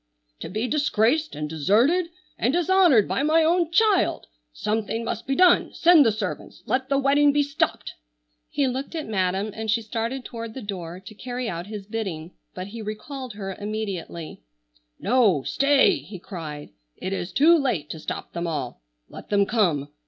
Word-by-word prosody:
"To - - -6
be 215 +5 -2
disgraced 295 +1 +1
and 150 0 -3
deserted 220 - +2 0.3
and 245 - +1
dishonored 350 - +4
by - - -1
my 315 +3 +4
own 340 +1 +2
child! 400 +1 +2 0.3
Something 220 - -2
must 225 +1 -4
be 270 - 0
done. 360 +1 +4
Send 340 -3 +6
the 225 - +3
servants! 210 -3 -5
Let 260 +1 -1
the 275 - +2
wedding 285 +1 +4
be 290 +1 +2
stopped!" 285 0 -2 0.6
He 285 - 0
looked 265 +5 -4
at 315 - -3
Madam 195 0 -1
and 220 0 -5
she 225 +2 +1
started 230 +4 -3
toward 230 -1 -7
the 265 - -6
door 180 -4 -6
to 190 +3 -12
carry 245 +2 -5
out 175 -2 -4
his 210 -2 -7
bidding, 190 -7 -5 0.2
but 185 - -5
he 225 +2 -7
recalled 240 +4 -6
her 195 -2 -5
immediately. 200 -6 -5 0.6
"No, 210 - +3
stay!" 275 0 +3
he 200 - -10
cried. 155 - -8 0.3
"It 190 - -4
is 185 -1 -4
too 325 +5 +6
late 245 - 0
to 160 - -6
stop - - -6
them 170 0 -3
all. 130 - -4 0.3
Let - - -12
them 200 -1 +3
come. 175 -11 +1
220 Hz, 175 wpm, -24 LUFS, 190-280 Hz, 0.6 s, Send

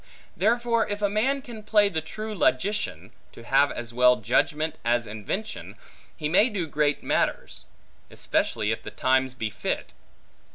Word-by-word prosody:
Therefore 230 +4 +2
if 205 0 -4
a 205 - +3
man 265 +6 +1
can 230 -3 -9
play 210 -1 +4
the 160 -5 -2
true 215 +7 -6
logician, 175 - 0 0.2
to 115 - -12
have 135 +4 +3
as 120 -1 -6
well 125 +1 +5
judgment, 150 +8 0
as 120 0 +1
invention, 110 - -5 0.4
he 150 - -2
may 195 +10 +4
do 195 -6 -2
great 150 -1 0
matters; - - -1 0.4
especially 105 0 -1
if 110 - -3
the - - -7
times 130 -1 +1
be 110 -4 -3
fit. 105 - -3
155 Hz, 155 wpm, -26 LUFS, -, 0.4 s, well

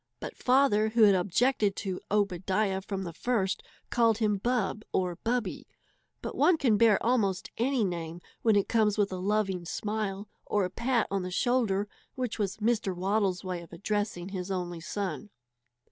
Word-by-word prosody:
His - - -5
father, 250 -5 +3
who 225 0 +4
had 205 -2 +7
objected 200 +3 +2
to 190 -2 -4
"Obadiah" 195 0 0
from 195 0 -4
the 170 -2 -6
first, 200 0 0 0.3
called 230 -3 +3
him 210 -3 +1
Bub 225 -2 0
or 180 -2 0
Bubby; 230 -4 -2 0.6
but - - -4
one 355 -2 +4
can 245 -8 +3
bear 215 -1 +5
almost 205 -7 +1
any 255 0 +2
name 170 -3 -3 0.2
when 220 -2 +4
it 200 - +2
comes 215 -3 +2
with 205 -2 +1
a 185 - -3
loving 195 -1 0
smile 205 +2 -3 0.2
or 205 -2 0
a 180 - -5
pat 235 +2 +1
on 195 -1 0
the 180 - -4
shoulder, 210 -1 +1 0.3
which 250 -4 -3
was 200 -3 -1
Mr. 215 -3 0
Waddle's 190 0 0
way 180 -2 -4
of 170 - -14
addressing 200 0 -2
his 185 -1 -5
only 175 -3 -3
son. 195 +1 -4
205 Hz, 170 wpm, -29 LUFS, 185-225 Hz, 0.6 s, had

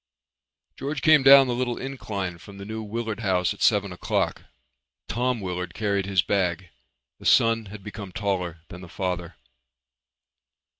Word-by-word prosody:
George 140 +2 -4
came 155 -3 +6
down 135 0 +9
the 125 - -1
little 120 0 -2
incline 100 -10 -5
from 100 +3 -13
the 100 - -8
New 110 +1 -5
Willard 110 0 -4
House 95 -5 +1
at - - -16
seven 100 -3 +3
o'clock. 90 - -2 0.6
Tom 125 0 -1
Willard 90 -2 -4
carried 100 -2 -1
his 95 -3 +2
bag. 90 -3 -1 0.5
The - - -13
son 115 -1 +4
had 100 0 -10
become 105 -2 -8
taller 90 -4 -2
than 90 -1 -10
the 90 - -11
father. 90 -1 -4
100 Hz, 150 wpm, -25 LUFS, 90-115 Hz, 0.6 s, down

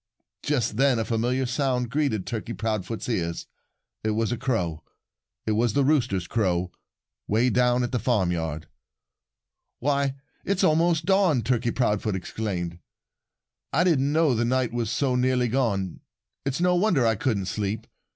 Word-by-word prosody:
Just 125 -8 0
then 135 -1 +4
a 110 - -1
familiar 120 +4 0
sound 125 -2 -1
greeted 135 -9 0
Turkey 115 0 -4
Proudfoot's 110 -1 -3
ears. 85 -8 -2 0.6
It 110 - 0
was 115 0 0
a - - +1
crow. 90 - -2 0.6
It 110 - 0
was 110 +1 +2
the 140 - +3
rooster's 125 - +1
crow, 90 -4 0 0.6
way 115 +4 +2
down 125 0 +3
at 120 - -2
the 125 - 0
farmyard. 85 - -1 1.1
"Why, 140 0 0 0.3
it's 200 -1 0
almost 165 -1 +3
dawn!" 185 - +3
Turkey 120 +1 +1
Proudfoot 105 -4 0
exclaimed. 90 -3 -4 0.9
"I 165 - +3
didn't 145 -6 +2
know 155 -3 +3
the 120 0 +1
night 125 -1 0
was 120 -2 -1
so 135 +1 0
nearly 125 0 +2
gone. 105 -8 0 0.5
It's 135 +1 -1
no 180 +1 +3
wonder 175 - +3
I 115 - +4
couldn't 105 -3 -1
sleep. 100 +3 -3
120 Hz, 150 wpm, -25 LUFS, 105-135 Hz, 1.1 s, then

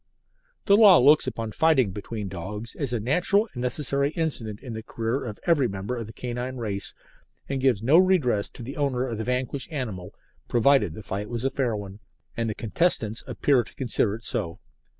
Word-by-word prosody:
The 200 - +6
Law 205 -4 +8
looks 145 +2 +5
upon 115 -3 -4
fighting 135 -7 +3
between 105 +1 -6
dogs 100 +5 -6
as 140 -5 -3
a 120 - -1
natural 180 - +2
and 120 - -5
necessary 140 +2 0
incident 120 -11 -2
in 125 -4 -7
the 110 - -5
career 115 +3 -3
of 110 -4 -6
every 150 -7 +3
member 100 +4 -4
of 115 -3 -5
the - - -9
canine 125 +2 -5
race, 100 -4 -1 0.5
and 135 -1 -2
gives 125 -6 +2
no 145 +8 +6
redress 160 - +2
to 120 - -8
the 135 +7 -7
owner 135 -3 0
of 115 -4 -4
the - - -2
vanquished 125 +4 -2
animal, 105 - -5 0.3
provided 120 - +3
the 110 - -9
fight 100 +3 -4
was 120 +1 -3
a 135 - +1
fair 125 -5 -1
one, 100 -1 -7 0.4
and 115 -1 -1
the 110 - -3
contestants 115 - 0
appear 135 -4 +2
to - - -17
consider 115 -5 +1
it 115 - -11
so. 85 -6 -2
120 Hz, 195 wpm, -25 LUFS, 110-140 Hz, 0.5 s, Law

